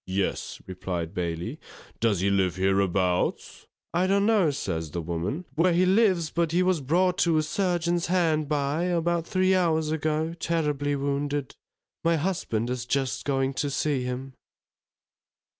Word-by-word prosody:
Yes_, 95 0 -2
replied 90 -3 -4
Bailey, 85 -1 -3 0.4
_does 105 -6 +1
he 100 - +2
live 95 -3 +1
hereabouts? 95 -1 0 0.3
I 180 +2 +2
don't 200 +1 +3
know, 210 -7 +4
says 85 - -3
the 85 +3 -4
woman, 90 - -3
where 170 +5 +3
he 180 +2 +3
lives, 185 -5 +3
but 170 -2 0
he 175 +2 +3
was 180 -4 +1
brought 180 +7 +1
to 170 -4 +3
a 155 - +2
surgeon's 175 0 0
hard 160 -4 +1
by, 150 +3 0
about 170 -1 0
three 185 0 +2
hours 160 -4 +2
ago, 155 +1 -1
terribly 150 -4 0
wounded. 140 0 -2 0.5
My 165 0 +3
husband 145 - -1
is 125 -1 -4
just 135 0 -1
going 135 -1 0
to 145 +2 -1
see 140 -1 0
him. 125 +2 -5
150 Hz, 150 wpm, -26 LUFS, 115-170 Hz, 0.5 s, know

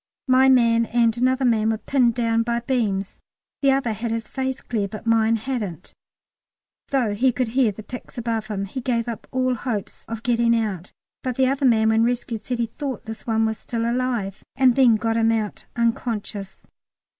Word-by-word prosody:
My 260 +1 +5
man 230 -3 +4
and 230 -1 +2
another 255 +2 +1
man 220 -2 +3
were 220 - 0
pinned 240 +1 +2
down 230 -1 +1
by 235 +1 -1
beams 210 -6 -1 0.4
the 275 - +4
other 265 -4 +1
had 230 +2 -4
his 225 0 -3
face 265 -1 -3
clear, 210 -4 -2
but 215 +3 -9
mine 225 0 +3
hadn't, 220 -7 -4 0.9
though 250 -7 +1
he 255 +5 +3
could 245 -1 -1
hear 245 -2 +2
the 215 +2 -10
picks 250 +4 -10
above 225 -2 -2
him. 200 -2 -3
He 255 +7 -6
gave 235 -2 -1
up 230 -2 -6
all 255 -1 +1
hopes 225 -4 -4
of 230 0 -6
getting 235 -1 +3
out, 195 -5 -4 0.3
but 255 -2 -3
the 265 - +3
other 270 +1 +2
man 220 -2 +4
when 220 0 +3
rescued 235 -2 -1
said 250 - -3
he 235 - +1
thought 260 +1 -6
this 220 +2 -8
one 225 -1 +2
was 220 -1 -2
still 230 -1 -2
alive, 235 -5 -2
and 260 -2 +5
then 250 -4 +6
got 225 +1 0
him 225 0 +3
out 220 -2 -3
unconscious. 225 -4 -2
230 Hz, 190 wpm, -23 LUFS, 220-250 Hz, 0.9 s, then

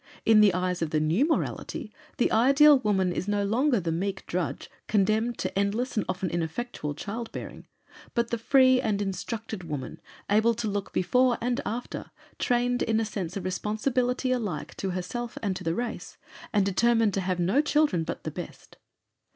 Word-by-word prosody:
In 220 -1 +6
the 210 -2 +6
eyes 180 -1 -1
of 165 - 0
the 155 - +1
new 165 - +2
morality 255 -7 -2 0.2
the - - +2
ideal 275 +5 +6
woman 195 -6 +1
is 185 - -3
no 205 0 +1
longer 245 +4 +2
the 170 -3 -2
meek 195 +4 -3
drudge 180 -1 -3 0.2
condemned 215 +3 +1
to - - -3
endless 205 +6 0
and 210 - +1
often 185 0 -1
ineffectual 165 -2 -3
child 225 +7 -5
bearing, - - -8 0.5
but 235 -1 0
the 235 - -1
free 260 +1 +5
and 215 -5 0
instructed 200 +1 -4
woman, 145 -6 -6 0.3
able 220 +3 +3
to 225 0 -3
look 200 -1 -3
before 250 +6 +2
and 245 +1 -1
after, 240 +3 -5 0.3
trained 245 0 +1
in 220 0 +1
a 225 - 0
sense 190 -4 -4
of 195 - -5
responsibility 245 +7 0
alike 210 -11 -3
to 195 - -2
herself 185 +7 -4
and 195 -3 0
to - - -6
the 165 0 -1
race, 240 +3 -5 0.3
and 205 -5 +2
determined 225 +2 +3
to 195 - 0
have 185 -1 -1
no 190 +11 +3
children 300 - +2
but - - -5
the - - -4
best. - - -9
215 Hz, 180 wpm, -27 LUFS, 185-240 Hz, 0.5 s, In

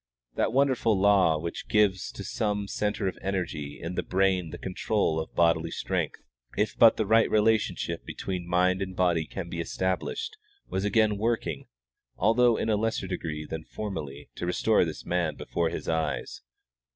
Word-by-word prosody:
That - - 0
wonderful 130 -5 +2
law 95 -5 +4
which 85 +2 -5
gives 100 -3 +2
to - - -7
some 105 -2 -1
centre 105 0 -1
of 95 - -4
energy 85 -7 -3
in 85 +2 -5
the - - -1
brain 95 -2 +1
the - - -7
control 95 -3 0
of 80 - -6
bodily 85 -1 +3
strength, - - -2 0.4
if 105 - +1
but 115 -1 +7
the 110 - +1
right 110 +2 +4
relationship 110 0 +1
between 90 -2 -5
mind 90 +2 +2
and 95 -1 -4
body 85 -4 +1
can 95 -3 -6
be 85 0 -5
established, 95 - -2 0.3
was 95 - -2
again 105 0 +2
working, 115 +1 -1 0.5
although 120 0 +4
in - - -1
a 105 - +3
lesser 110 -2 -1
degree 80 -4 -4
than 80 0 -5
formerly, 75 -9 -6
to 90 - -3
restore 100 +2 +3
this 80 - -6
man 85 -4 0
before 85 -1 -1
his 85 - -6
eyes. 80 -1 -2
95 Hz, 165 wpm, -27 LUFS, 85-105 Hz, 0.5 s, but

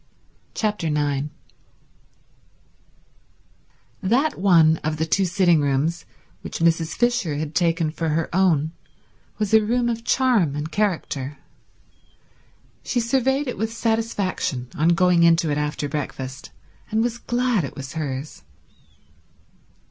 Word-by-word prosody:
Chapter 210 -7 -1
9 145 -1 0 2.7
That 245 +9 +1
one 165 -5 +5
of 155 0 -3
the 160 - 0
two 190 +4 +1
sitting 175 -3 +3
rooms 145 +4 0 0.4
which - - -6
Mrs. 165 -1 +1
Fisher 240 -10 +1
had 150 +1 -4
taken 165 -1 +1
for 165 0 -2
her 160 +1 0
own 165 -5 +2 0.7
was 215 0 -2
a 220 -1 +6
room 240 +2 +1
of 230 -1 -3
charm 230 - +2
and 150 +2 -4
character. 155 -8 -2 1.4
She 245 - -1
surveyed 265 +4 +1
it 250 - -4
with 220 +1 -1
satisfaction 215 - -1
on 160 +3 +2
going 180 -1 +3
into 165 -1 +4
it 145 - 0
after 150 0 -2
breakfast, 135 -2 -5 0.4
and 220 +1 +1
was 240 0 -2
glad 245 -6 0
it 135 - -6
was 135 0 -7
hers. 140 - -5
170 Hz, 125 wpm, -23 LUFS, 150-220 Hz, 2.7 s, a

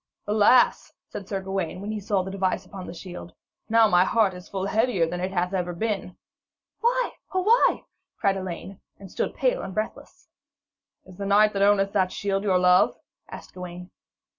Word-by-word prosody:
'Alas,' 215 +4 +4 0.2
said 195 - -8
Sir 195 -1 -3
Gawaine, 190 -3 -3
when 205 +2 -5
he 215 - -3
saw 200 -2 0
the 190 - -6
device 190 -1 -1
upon 185 0 -9
the - - -7
shield, 175 0 -9 0.4
'now 225 0 +5
is 215 - +1
my 180 0 +6
heart 205 0 +2
full 190 -1 -3
heavier 220 -4 +1
than 175 +2 -4
it 185 +1 -2
hath 180 0 -1
ever 180 -2 -1
been.' 195 -1 -3 0.6
'Why, - - +1 0.2
oh 375 - +1
why?' 460 +5 +3 0.3
cried 195 -3 +1
Elaine, 190 +1 -7 0.2
and 195 -2 -12
stood - - -3
pale - - +1
and 190 - -7
breathless. 215 0 -5 0.8
'Is 185 -1 -15
the 200 -1 -4
knight 210 +1 +4
that 195 - -2
owneth 200 -1 +3
that 190 -3 +1
shield 195 -1 -2
your 195 -3 +2
love?' 180 0 +4 0.3
asked - - -10
Gawaine. 180 0 -9
195 Hz, 185 wpm, -25 LUFS, 185-210 Hz, 0.8 s, my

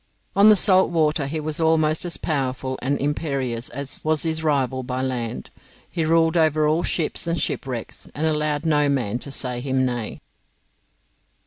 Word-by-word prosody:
On 200 +2 +7
the 215 - +8
salt 190 -1 +4
water 155 -4 +1
he 155 +3 -3
was 155 +1 -2
almost 160 0 +2
as 175 - 0
powerful 130 -3 -2
and 140 +3 0
imperious 140 -5 -2
as 140 +2 -5
was 155 -1 +1
his 160 -1 -2
rival 135 -4 0
by 125 0 -4
land. 120 - -4 0.4
He 165 - -2
ruled 165 +1 +2
over 155 -2 +3
all 155 +3 +2
ships 165 0 0
and 170 0 0
shipwrecks, 125 -4 -3
and 155 - -1
allowed 150 -1 0
no 150 -2 +3
man 120 -5 -1
to 140 - -7
say 125 -3 -1
him 130 0 0
nay. 120 -3 -4
150 Hz, 165 wpm, -22 LUFS, 130-160 Hz, 0.4 s, the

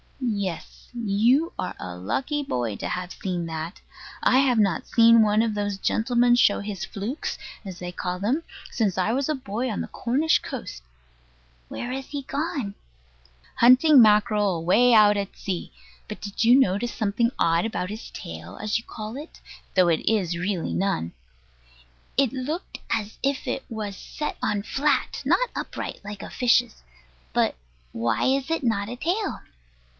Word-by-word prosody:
Yes. 200 -9 -4
You 235 - +2
are 185 - -3
a 90 -1 -6
lucky 265 - -2
boy 120 - -2
to - - -4
have 180 0 -4
seen 180 -3 -3
that. 160 +2 -5 0.4
I 255 - +5
have 260 -3 +3
not 195 -6 +1
seen 230 0 +6
one 215 +1 +4
of 225 -2 0
those 205 -1 -2
gentlemen 240 +4 +2
show 210 -4 +4
his 200 -3 -5
"flukes," 215 +11 -4 0.3
as 190 -4 -7
they 180 0 -6
call 180 0 -3
them, 230 - 0 0.3
since 205 -6 0
I 190 +4 +1
was 275 +3 0
a 305 - +1
boy 250 0 -3
on 215 - -2
the - - -4
Cornish 280 +7 +1
coast. - - -7 0.9
Where 245 - -5
is 265 +1 -4
he 285 -1 -5
gone? 275 -7 -3 0.8
Hunting 255 +4 +7
mackerel, 210 -2 +4
away 185 +9 +4
out 210 -2 +6
at 200 -1 -4
sea. 185 -3 -4 0.4
But - - -7
did 205 +2 -3
you 245 +4 +7
notice 225 0 +1
something 225 +2 0
odd 165 +3 +2
about 200 -4 -3
his 220 +2 -7
tail, 80 +2 -9
as 215 +2 -1
you - - -12
call 215 0 -7
it 300 +3 -10 0.4
though 185 -2 +5
it 165 +3 +1
is 190 -6 +1
really 185 0 -2
none? 180 - -1 1.1
It 275 -2 +3
looked 285 +7 -4
as 215 -1 -2
if 275 -1 -1
it 265 - -2
was 215 -4 -4
set 300 - -5
on 205 -1 0
flat, 275 +3 0
and - - -4
not - - +3
upright, - - -5
like 205 0 -7
a - - -8
fish's. 245 -1 +2 0.5
But - - +2 0.4
why 115 +2 0
is 270 +2 +1
it 325 -3 -1
not 215 -4 0
a 245 - -5
tail? 360 - -2
215 Hz, 170 wpm, -25 LUFS, 195-255 Hz, 1.1 s, Hunting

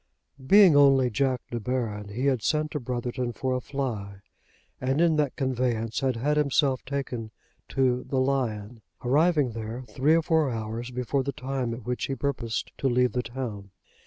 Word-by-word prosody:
Being 195 +2 +7
only 135 -3 +5
Jack 130 +1 0
De 120 - -2
Baron 110 -4 -3
he 120 +6 -3
had 130 -5 +2
sent 155 +5 0
to 150 - -2
Brotherton 125 0 -3
for 130 +1 -2
a 125 - -1
fly, 110 -8 -4 0.6
and 135 +3 0
in 170 -2 +4
that 145 -3 0
conveyance 125 -4 -1
had 130 -2 0
had 145 +6 0
himself 140 -2 +2
taken 130 -5 -4 0.4
to 125 -2 +1
the 135 - -2
"Lion," 120 -5 -1 0.2
arriving 145 0 +3
there 115 +3 -6
three 130 +7 +2
or 165 - +2
four 160 -3 +2
hours 115 +1 -4
before 125 +2 -1
the 140 +1 -2
time 130 -2 -3
at 120 - -10
which 125 +2 -2
he 135 - -2
purposed 120 -4 -2
to 135 - +1
leave 125 0 +2
the 125 - -1
town. 115 -5 -6
130 Hz, 175 wpm, -27 LUFS, 115-140 Hz, 0.6 s, Being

